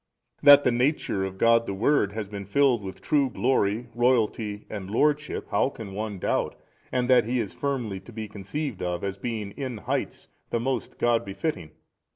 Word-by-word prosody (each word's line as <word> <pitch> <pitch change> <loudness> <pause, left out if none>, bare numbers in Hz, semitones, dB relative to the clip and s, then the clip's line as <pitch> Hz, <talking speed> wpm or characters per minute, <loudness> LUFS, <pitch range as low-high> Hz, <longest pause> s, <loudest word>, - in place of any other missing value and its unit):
A. - - -11
That 145 0 +10
the 125 - +3
Nature 125 -5 0
of 95 0 -4
God 115 +2 +4
the 100 - -3
Word 105 -1 +2
has 110 -2 -4
been 100 -1 -7
filled 130 0 +3
with 95 -1 -8
true 140 -3 +2
glory, 120 -3 +1
Royalty 115 -3 +1
and 100 -3 -6
Lordship, 150 +7 0
how - - +2
can 110 -7 -9
one 105 0 -4
doubt? - - -1 0.4
and 125 -1 0
that 125 -4 +5
He 125 +2 0
is 105 -5 -3
firmly 125 -9 -2
to 95 +5 -14
be 110 -1 -5
conceived 110 +5 -5
of 90 -1 -2
as 100 -1 -3
being 110 -2 -4
in 130 0 -5
heights - - -3 0.2
the 115 - 0
most 130 +2 -3
God 120 -1 +2
befitting? 95 - -4
115 Hz, 190 wpm, -26 LUFS, 100-130 Hz, 0.4 s, That